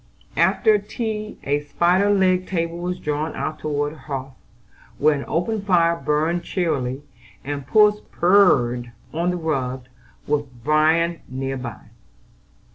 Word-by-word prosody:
After 215 -2 +4
tea 215 0 -4
a 145 +1 +1
spider 175 +7 +2
legged 185 -2 +2
table 170 -2 -2
was 180 +1 -3
drawn 150 0 -3
out 155 0 -3
toward 145 0 -2
the - - -13
hearth, 135 -1 -6 0.6
where 155 +1 +4
an 140 -1 -3
open 205 +6 -1
fire 170 -4 +3
burned 165 +2 0
cheerily, 145 -7 -2 0.4
and 140 -1 -5
puss 210 +4 +5
purred 125 -11 +3 0.2
on 170 +3 0
the 180 - -1
rug, 130 -6 -2 0.4
with 145 -2 -1
Bran 160 +3 +2
near 135 +1 -3
by. 125 -4 -8
160 Hz, 130 wpm, -22 LUFS, 140-180 Hz, 0.6 s, puss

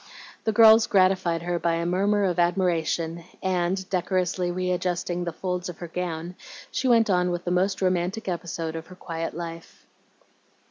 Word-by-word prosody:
The 220 - +2
girls 220 0 +7
gratified 185 -3 +2
her 175 0 -1
by 170 -1 +1
a 170 0 -2
murmur 200 +4 +1
of 180 -2 0
admiration, 170 -2 0 0.2
and, 185 0 0
decorously 180 -1 0
readjusting 180 -1 -1
the 170 - -2
folds 180 +1 -3
of 175 - -8
her 175 - -7
gown, 170 0 -4 0.4
she 260 - -1
went 230 -2 +5
on 180 -2 +2
with 175 0 -3
the 175 - -1
most 190 +2 +1
romantic 185 +3 0
episode 170 -2 -3
of 165 0 -6
her 185 - -12
quiet 165 -3 -5
life. 165 -1 -8
180 Hz, 165 wpm, -25 LUFS, 170-185 Hz, 0.4 s, girls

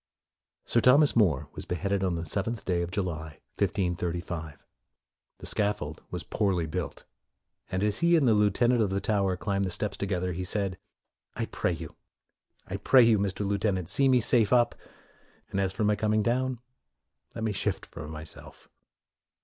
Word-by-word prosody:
Sir 115 - +2
Thomas 140 +5 +5
More 90 - +3
was - - -7
beheaded 95 +2 -1
on 90 -2 0
the 85 0 -4
seventh 105 +7 -3
day 90 -2 0
of 85 - -3
July, 80 -5 -4 0.2
1535. 85 -3 -2 0.7
The - - -10
scaffold 100 -8 0
was - - -5
poorly 95 -5 0
built, 80 0 -5 0.7
and 95 +2 -1
as 105 0 +1
he 170 0 +4
and 150 -6 +3
the 115 - +5
lieu 105 -1 +4
tenant 120 +4 +2
of 105 - +2
the 95 +1 -1
Tower 100 -2 0
climbed 100 0 -1
the - - -2
steps 100 +2 -3
to 100 - -2
gether, 90 -1 -1
he 90 +2 -4
said, 95 0 0 0.3
" - - -50
I - - -1
pray - - -1
you, - - -8 0.7
I 95 - -4
pray 125 +5 +6
you, 115 -3 +4
Mr. 100 0 -1
Lieutenant, 100 -3 -1
see 135 -1 +3
me 130 -1 +5
safe 110 -2 +4
up, 120 -1 +4 0.8
and 95 -1 0
for 100 - -2
my 105 0 +3
coming 110 +1 +1
down, 130 +3 0 0.8
let 115 - -4
me 110 - 0
shift 100 - -2
for - - -9
my 80 0 -7
self." 80 - -10
100 Hz, 180 wpm, -28 LUFS, 90-110 Hz, 0.8 s, pray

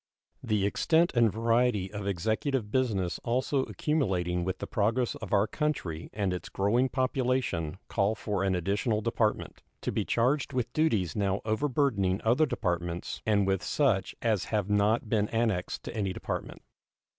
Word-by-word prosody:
The 105 -2 0
extent 165 - +2
and 115 -4 +4
variety 115 -3 +1
of 100 -1 -4
executive 110 - -1
business 105 -9 0
also 130 +3 0
accumulating 90 - 0
with 95 +1 -2
the - - -5
progress 115 +4 0
of 110 - -8
our 100 0 +4
country 105 - -3
and 100 -3 -1
its 90 - -5
growing 115 +7 +1
population 130 - 0
call 105 +1 +1
for 100 -3 -2
an 95 -1 +1
additional 105 +5 0
department, 110 -1 -1 0.2
to - - -2
be - - 0
charged 130 +4 +1
with 125 -2 -2
duties 110 - +1
now 100 -1 0
over 110 +7 0
burdening 105 -9 +1
other 125 +8 +3
departments 90 -8 -3
and 100 -2 +3
with 95 -1 +1
such 115 -10 +1
as 110 -5 +1
have 105 -2 -1
not 105 +3 +2
been 105 -1 +1
annexed 110 -6 -1
to - - -7
any 100 -4 -1
department. - - -5
105 Hz, 155 wpm, -29 LUFS, 95-125 Hz, 0.2 s, and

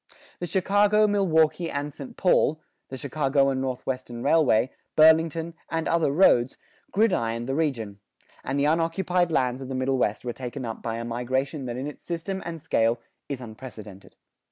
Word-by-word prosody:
The 175 - -3
Chicago, 205 +4 +3
Milwaukee 170 -5 +2
and 145 0 -3
St. 240 - -9
Paul, 160 -4 +3 0.3
the 130 - -6
Chicago 140 0 +1
and 130 -1 -1
Northwestern 130 -2 -4
Railway, 130 -6 +3 0.2
Burlington, 160 +1 +4 0.2
and 165 -1 -2
other 165 -4 +2
roads, 135 -6 +4 0.3
gridironed 120 - +1
the 135 - -2
region; 120 -10 -2 0.4
and 140 +1 -2
the 140 - +2
unoccupied 170 +2 +1
lands 130 -3 0
of 130 - -7
the 130 - -3
Middle 130 0 0
West 105 0 0
were 120 - -2
taken 130 +1 -6
up 115 -1 -6
by 115 0 -3
a 115 - -4
migration 130 +4 -2
that 120 0 -4
in 130 - -4
its 150 - -8
system 180 +3 -4
and 165 -1 -5
scale 115 -5 +1 0.3
is 135 -3 -4
unprecedented. 110 -4 -10
140 Hz, 165 wpm, -26 LUFS, 125-165 Hz, 0.4 s, Burlington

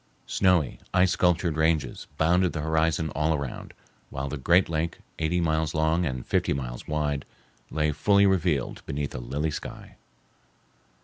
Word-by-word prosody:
Snowy, 90 -8 +2 0.2
ice 90 0 +4
sculptured 85 -2 +2
ranges 80 -5 0
bounded 90 +3 +3
the 75 - -3
horizon 80 0 +1
all 75 +2 +1
around, 70 -4 -5 0.4
while 70 +1 -4
the 75 - -3
great 85 +7 +3
lake, 85 +1 -2 0.2
eighty 80 +2 +1
miles 80 -2 0
long 80 +2 +2
and 65 -3 -4
fifty - - +1
miles - - -5
wide, 75 -2 -1 0.5
lay 75 0 +1
fully 100 +7 +4
revealed 90 -8 +1
beneath 70 0 -3
a 60 - -5
lily 70 +6 -2
sky. - - -8
80 Hz, 145 wpm, -26 LUFS, 70-85 Hz, 0.5 s, ice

